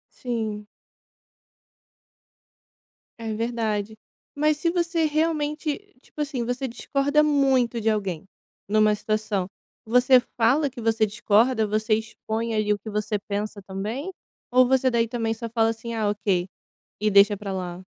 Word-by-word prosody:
Sim. 220 Hz, -4 st, -3 dB, 2.5 s
É 225 Hz, -1 st, -4 dB
verdade, 220 Hz, -2 st, -2 dB, 0.4 s
mas 305 Hz, +1 st, +2 dB
se 335 Hz, +3 st, 0 dB
você 335 Hz, -2 st, 0 dB
realmente, 310 Hz, +4 st, -1 dB
tipo -, -, -12 dB
assim, 280 Hz, -5 st, -2 dB
você 245 Hz, +3 st, -2 dB
discorda 280 Hz, +4 st, +1 dB
muito 270 Hz, -5 st, +2 dB
de 220 Hz, -, 0 dB
alguém 195 Hz, -6 st, -1 dB, 0.4 s
numa 215 Hz, 0 st, +4 dB
situação, 210 Hz, -3 st, -2 dB, 0.4 s
você 250 Hz, +2 st, +5 dB, 0.2 s
fala 265 Hz, +6 st, +3 dB
que 250 Hz, -2 st, -10 dB
você 225 Hz, -1 st, +2 dB
discorda, 220 Hz, +2 st, +2 dB
você 215 Hz, +1 st, +1 dB
expõe 220 Hz, +1 st, -3 dB
ali 215 Hz, -1 st, +1 dB
o 205 Hz, -, -1 dB
que 215 Hz, +2 st, -8 dB
você 210 Hz, 0 st, -1 dB
pensa 205 Hz, 0 st, -3 dB
também, 215 Hz, -, -4 dB, 0.4 s
ou 255 Hz, +1 st, +5 dB
você 260 Hz, 0 st, +3 dB
daí 235 Hz, -1 st, +2 dB
também 225 Hz, -1 st, -2 dB
só 230 Hz, +1 st, -5 dB
fala 225 Hz, 0 st, +2 dB
assim, 225 Hz, +1 st, -4 dB
"Ah, 220 Hz, -2 st, 0 dB
ok", 200 Hz, -3 st, 0 dB, 0.5 s
e 215 Hz, 0 st, +2 dB
deixa 200 Hz, +1 st, +6 dB
pra 200 Hz, -1 st, -5 dB
lá? 180 Hz, -1 st, -5 dB
225 Hz, 140 wpm, -24 LUFS, 210-260 Hz, 2.5 s, deixa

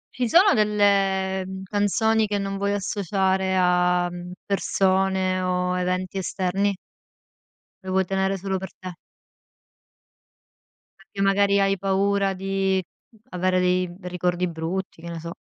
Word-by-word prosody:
Ci 245 Hz, -2 st, -1 dB
sono 375 Hz, -, +6 dB
delle, 195 Hz, -3 st, +2 dB
mhmm, 190 Hz, 0 st, -7 dB
canzoni 215 Hz, +3 st, +1 dB
che 205 Hz, 0 st, -1 dB
non 195 Hz, 0 st, -3 dB
vuoi 200 Hz, +1 st, 0 dB
associare 190 Hz, -1 st, 0 dB
a, 180 Hz, 0 st, +3 dB
mhmm, 175 Hz, 0 st, -8 dB
persone 190 Hz, -1 st, +1 dB
o 180 Hz, 0 st, 0 dB
eventi 185 Hz, +1 st, -2 dB
esterni? 195 Hz, +2 st, -1 dB, 1.1 s
Lo 190 Hz, -, -5 dB
vuoi 190 Hz, 0 st, +2 dB
tenere 195 Hz, +1 st, 0 dB
solo 190 Hz, +1 st, -2 dB
per 190 Hz, 0 st, -6 dB
te. 185 Hz, -1 st, -7 dB, 2.1 s
Perché 195 Hz, 0 st, -8 dB
magari 200 Hz, 0 st, +3 dB
hai 195 Hz, 0 st, +2 dB
paura 195 Hz, +1 st, +1 dB
di 195 Hz, 0 st, 0 dB, 0.5 s
avere 185 Hz, 0 st, 0 dB
dei, 180 Hz, 0 st, +1 dB
mhmm, 175 Hz, +1 st, -12 dB
ricordi 180 Hz, 0 st, -1 dB
brutti, 165 Hz, +2 st, -5 dB
che 170 Hz, -, -8 dB
ne 170 Hz, -, -6 dB
so? 170 Hz, +1 st, -7 dB
190 Hz, 130 wpm, -24 LUFS, 180-195 Hz, 2.1 s, sono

